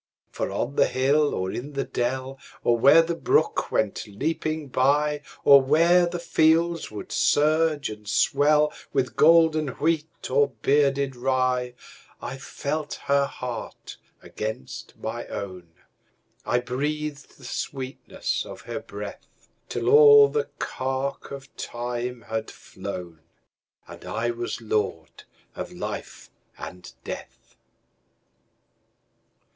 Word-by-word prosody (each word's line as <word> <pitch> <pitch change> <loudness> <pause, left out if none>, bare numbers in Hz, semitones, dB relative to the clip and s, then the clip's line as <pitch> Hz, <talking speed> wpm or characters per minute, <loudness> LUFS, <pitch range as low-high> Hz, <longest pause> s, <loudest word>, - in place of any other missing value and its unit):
For - - -3
on 140 +4 -3
the - - +5
hill 145 +3 +2
or 95 0 -2
in 140 +4 -6
the 135 0 -1
dell, 130 +1 -3 0.2
Or 120 - +4
where 140 +8 +7
the 170 +1 -2
brook 165 - +1
went 110 +1 -1
leaping 155 +7 -2
byOr 145 +3 +2 0.4
where 170 +5 +4
the 175 +1 -3
fields 165 0 +2
would 105 -1 -8
surge 155 0 +2
and 105 -1 -9
swellWith 145 +2 +1
golden 160 -1 +5
wheat 155 +3 -2
or 140 0 +3
bearded 140 -1 +2
rye,I 125 0 -3
felt 145 +2 -4
her 140 0 +3
heart 125 -3 -7 0.3
against 110 -11 -6
my - - -5
own,I 95 +5 -6
breathed 145 +3 -4
the 130 - -14
sweetness 130 +1 -4
of - - -10
her - - -5
breath, - - -8 0.4
Till - - -3
all 435 -1 +8
the 450 0 -1
cark 135 +1 -3
of 140 -1 -10
time 120 0 -4
had 110 0 -4
flown, 85 -3 -8 0.7
And - - -11
I 120 +1 -2
was 120 0 -4
lord 105 -8 -3 0.3
of - - -6
life - - -7 0.3
and 90 -1 -9
death. - - -9
140 Hz, 110 wpm, -25 LUFS, 120-155 Hz, 0.7 s, all